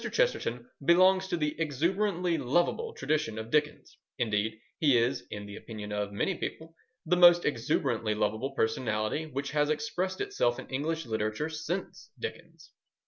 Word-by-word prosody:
Chesterton 125 Hz, -, 0 dB, 0.2 s
belongs 185 Hz, +4 st, +5 dB
to 180 Hz, -2 st, -1 dB
the 150 Hz, -2 st, 0 dB
exuberantly 175 Hz, +4 st, +1 dB
lovable 175 Hz, -, 0 dB
tradition 150 Hz, -8 st, -1 dB
of 110 Hz, +1 st, -6 dB
Dickens; 150 Hz, -, 0 dB, 0.2 s
indeed, 110 Hz, 0 st, 0 dB, 0.2 s
he 140 Hz, -6 st, +5 dB
is, 125 Hz, +3 st, 0 dB
in 105 Hz, -1 st, -6 dB
the 100 Hz, 0 st, -8 dB
opinion 105 Hz, -2 st, -8 dB
of 105 Hz, -1 st, -2 dB
many 105 Hz, -, 0 dB
people, 160 Hz, +1 st, -5 dB, 0.3 s
the 175 Hz, +3 st, +3 dB
most 175 Hz, -1 st, +7 dB
exuberantly 115 Hz, -4 st, 0 dB
lovable 110 Hz, +4 st, 0 dB
personality 110 Hz, +5 st, 0 dB
which 140 Hz, -1 st, -4 dB
has 150 Hz, -1 st, +2 dB
expressed 185 Hz, +3 st, -1 dB
itself 410 Hz, +5 st, 0 dB
in -, -, -7 dB
English 155 Hz, +4 st, -2 dB
literature 110 Hz, +6 st, -2 dB
since 160 Hz, +4 st, -5 dB
Dickens. 450 Hz, -, -8 dB
150 Hz, 145 wpm, -30 LUFS, 110-175 Hz, 0.3 s, most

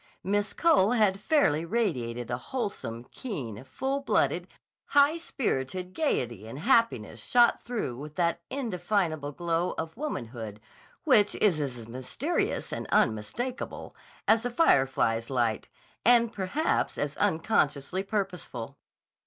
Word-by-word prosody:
Miss 205 Hz, +1 st, 0 dB
Cole 290 Hz, -, +4 dB
had 210 Hz, -5 st, +3 dB
fairly 205 Hz, -, +2 dB
radiated 125 Hz, -, -1 dB
a 120 Hz, -, 0 dB
wholesome, 200 Hz, -, -4 dB
keen, 130 Hz, -, -5 dB
full 265 Hz, -, -2 dB
blooded, 275 Hz, -, +1 dB, 0.4 s
high 285 Hz, +3 st, +4 dB
spirited 185 Hz, -, -3 dB
gayety 120 Hz, -, -1 dB
and 115 Hz, -, -7 dB
happiness 155 Hz, -, +1 dB
shot 240 Hz, -1 st, +4 dB
through 230 Hz, -, -3 dB
with 150 Hz, +4 st, -9 dB
that 170 Hz, -1 st, +1 dB
indefinable 180 Hz, -, -1 dB
glow 170 Hz, +3 st, -1 dB
of 160 Hz, 0 st, -4 dB
womanhood 120 Hz, -, -5 dB, 0.4 s
which 215 Hz, -10 st, +4 dB
is 175 Hz, -8 st, +2 dB
as 125 Hz, -5 st, -5 dB
mysterious 130 Hz, -, -2 dB
and -, -, -4 dB
unmistakable 120 Hz, -, -1 dB, 0.3 s
as 220 Hz, 0 st, +5 dB
the 245 Hz, -, -2 dB
firefly's 135 Hz, -, +2 dB
light 120 Hz, -4 st, 0 dB, 0.3 s
and 235 Hz, -1 st, +5 dB
perhaps 215 Hz, -, 0 dB
as 145 Hz, 0 st, -2 dB
unconsciously 160 Hz, -1 st, +1 dB
purposeful. 180 Hz, -, -4 dB
180 Hz, 120 wpm, -28 LUFS, -, 0.4 s, as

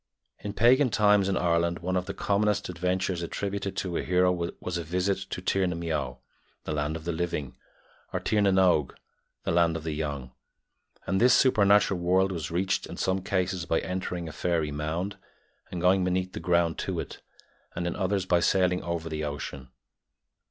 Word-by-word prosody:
In 100 Hz, -, -5 dB
pagan 125 Hz, +5 st, +5 dB
times 105 Hz, -2 st, +4 dB
in 95 Hz, -, +1 dB
Ireland 85 Hz, 0 st, +1 dB
one 90 Hz, +2 st, -2 dB
of 90 Hz, 0 st, -1 dB
the -, -, -5 dB
commonest 105 Hz, 0 st, +1 dB
adventures 90 Hz, +1 st, -1 dB
attributed 100 Hz, +2 st, -3 dB
to 90 Hz, -3 st, -2 dB
a -, -, 0 dB
hero 90 Hz, 0 st, +3 dB, 0.3 s
was 90 Hz, -, -4 dB
a -, -, -3 dB
visit 90 Hz, +4 st, 0 dB
to 90 Hz, -, -5 dB
"tír 95 Hz, -1 st, +1 dB
na 90 Hz, -, -2 dB
m 85 Hz, -, -6 dB
beó," 75 Hz, -7 st, -2 dB, 0.5 s
the -, -, -4 dB
land 75 Hz, +1 st, -1 dB
of 80 Hz, -1 st, -7 dB
the 85 Hz, -, -1 dB
living, 80 Hz, -5 st, -3 dB, 0.6 s
or -, -, -1 dB
to -, -, -1 dB
"tír 105 Hz, -, +4 dB
na 100 Hz, -, +4 dB
n 95 Hz, -, +2 dB
óg," 90 Hz, -7 st, +3 dB, 0.5 s
the -, -, -1 dB
land 85 Hz, -1 st, +3 dB
of 80 Hz, -, -8 dB
the 80 Hz, -1 st, -3 dB
young; 70 Hz, -4 st, -4 dB, 0.7 s
and 95 Hz, +3 st, 0 dB
this 125 Hz, 0 st, +6 dB
supernatural 100 Hz, -6 st, +4 dB
world 95 Hz, +2 st, +2 dB
was 85 Hz, -4 st, -4 dB
reached 95 Hz, +3 st, 0 dB
in -, -, -8 dB
some 95 Hz, 0 st, 0 dB
cases 90 Hz, -2 st, -1 dB
by 80 Hz, -, +2 dB
entering 90 Hz, -2 st, -4 dB
a -, -, -6 dB
fairy 80 Hz, -2 st, -1 dB
mound 80 Hz, +7 st, -3 dB, 0.5 s
and 90 Hz, -, -5 dB
going 90 Hz, +1 st, +4 dB
beneath 90 Hz, 0 st, -1 dB
the -, -, -5 dB
ground 85 Hz, -1 st, +1 dB
to -, -, -2 dB
it, -, -, -7 dB, 0.5 s
and 85 Hz, -, -2 dB
in 85 Hz, -, -2 dB
others 95 Hz, 0 st, 0 dB
by 90 Hz, -2 st, +3 dB
sailing 90 Hz, 0 st, +2 dB
over 85 Hz, -1 st, -3 dB
the 80 Hz, -1 st, -3 dB
ocean. 70 Hz, -3 st, -5 dB
90 Hz, 195 wpm, -27 LUFS, 85-95 Hz, 0.7 s, this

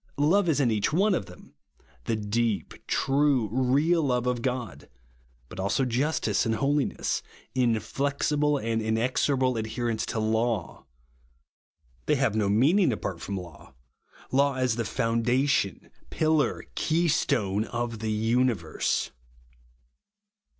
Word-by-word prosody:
Love 170 Hz, +6 st, +3 dB
is 150 Hz, -, +2 dB
in 125 Hz, -5 st, +2 dB
each 105 Hz, +5 st, 0 dB
of 190 Hz, -, +2 dB
them; 90 Hz, -2 st, -15 dB, 0.5 s
the 115 Hz, -, 0 dB
deep, 110 Hz, +1 st, -1 dB
true, 135 Hz, -4 st, +2 dB
real 140 Hz, +7 st, +2 dB
love 125 Hz, -4 st, 0 dB
of 125 Hz, -1 st, -1 dB
God; 125 Hz, -5 st, -4 dB, 0.6 s
but -, -, -10 dB
also 100 Hz, +8 st, +1 dB
justice 125 Hz, -4 st, 0 dB
and 115 Hz, -1 st, 0 dB
holiness; 140 Hz, +3 st, 0 dB, 0.3 s
inflexible 140 Hz, +4 st, 0 dB
and 115 Hz, -3 st, -1 dB
inexorable 130 Hz, +3 st, +1 dB
adherence 110 Hz, +1 st, -2 dB
to -, -, -3 dB
laiu. 110 Hz, -3 st, -1 dB, 1.2 s
They 150 Hz, -, +3 dB
have 130 Hz, -6 st, +1 dB
no 105 Hz, -2 st, +1 dB
meaning 145 Hz, -, +4 dB
apart 95 Hz, -5 st, -4 dB
from 100 Hz, 0 st, -4 dB
lavj; 85 Hz, -7 st, -11 dB, 0.6 s
law 140 Hz, +1 st, +2 dB
as 130 Hz, -3 st, +1 dB
the 115 Hz, -1 st, -2 dB
ioundation, 115 Hz, -1 st, 0 dB, 0.2 s
pillar, 155 Hz, -2 st, +1 dB
keystone 120 Hz, -, +1 dB
of 120 Hz, -1 st, -4 dB
the 110 Hz, 0 st, -2 dB
universe. 110 Hz, -6 st, 0 dB
120 Hz, 115 wpm, -27 LUFS, 110-140 Hz, 1.2 s, meaning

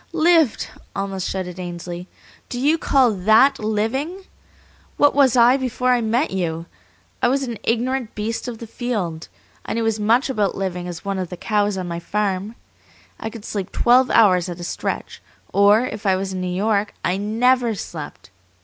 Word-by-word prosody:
"Lived!" 330 Hz, -5 st, +3 dB, 0.3 s
almost 195 Hz, -2 st, -3 dB
shouted 185 Hz, -1 st, -4 dB
Ainsley. 175 Hz, 0 st, -6 dB, 0.4 s
"Do 245 Hz, -, -4 dB
you 300 Hz, +5 st, +2 dB
call 265 Hz, -6 st, +3 dB
THAT 220 Hz, +8 st, +4 dB
living? 235 Hz, -, -2 dB, 0.7 s
What 290 Hz, 0 st, +5 dB
was 265 Hz, -3 st, +4 dB
I 245 Hz, +2 st, +6 dB
before 255 Hz, -1 st, 0 dB
I 245 Hz, -1 st, +3 dB
met 235 Hz, +6 st, 0 dB
you? 165 Hz, -3 st, -2 dB, 0.6 s
I -, -, +4 dB
was 275 Hz, +2 st, +1 dB
an 235 Hz, -5 st, -5 dB
ignorant 240 Hz, +1 st, -1 dB
beast 225 Hz, +4 st, -3 dB
of 240 Hz, -2 st, -5 dB
the 230 Hz, -, -8 dB
field. 210 Hz, -9 st, -3 dB, 0.4 s
I -, -, -4 dB
knew 230 Hz, 0 st, -1 dB
as 220 Hz, -1 st, 0 dB
much 230 Hz, +5 st, +3 dB
about 210 Hz, -7 st, 0 dB
living 180 Hz, -2 st, -3 dB
as 175 Hz, +2 st, -7 dB
one 195 Hz, -1 st, -2 dB
of 180 Hz, -2 st, -3 dB
the 180 Hz, -, -7 dB
cows 205 Hz, +1 st, 0 dB
on 185 Hz, -1 st, -4 dB
my 170 Hz, -1 st, -4 dB
farm. 200 Hz, +3 st, -2 dB, 0.6 s
I 220 Hz, -, -4 dB
could 225 Hz, -1 st, -10 dB
sleep 200 Hz, -2 st, -4 dB
twelve 250 Hz, +2 st, +4 dB
hours 185 Hz, -5 st, +4 dB
at 175 Hz, 0 st, -6 dB
a -, -, -6 dB
stretch, -, -, -4 dB, 0.3 s
or, 205 Hz, +4 st, +5 dB
if 215 Hz, -4 st, -5 dB
I 190 Hz, -, +4 dB
was 190 Hz, 0 st, -3 dB
in 185 Hz, -, -3 dB
New 185 Hz, -, -2 dB
York, 205 Hz, +3 st, 0 dB
I 180 Hz, -, +1 dB
NEVER 230 Hz, +3 st, +2 dB
slept. 155 Hz, -, -8 dB
215 Hz, 180 wpm, -21 LUFS, 185-245 Hz, 0.7 s, I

